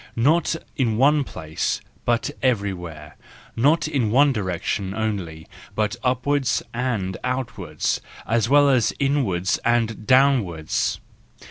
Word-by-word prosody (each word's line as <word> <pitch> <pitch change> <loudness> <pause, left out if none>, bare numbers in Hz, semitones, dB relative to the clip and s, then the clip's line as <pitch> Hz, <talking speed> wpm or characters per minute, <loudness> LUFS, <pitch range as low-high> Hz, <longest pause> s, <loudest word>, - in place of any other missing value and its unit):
—not 155 +8 +2 0.2
in 115 -6 +1
one 145 +3 +4
place, 80 - -3 0.3
but 120 +4 +1
everywhere, 90 - -2 0.4
not 145 +8 +3
in 135 -8 0
one 140 +5 +4
direction 95 -1 -2
only, 95 -8 -3 0.3
but 110 +1 0
upwards 130 +1 +1
and 115 -7 -2
outwards, 125 -1 -2 0.2
as 115 0 +1
well 145 +1 +6
as 130 -5 +3
inwards 120 -11 +1
and 115 -2 0
downwards. 125 - +2
115 Hz, 110 wpm, -23 LUFS, 95-135 Hz, 0.4 s, well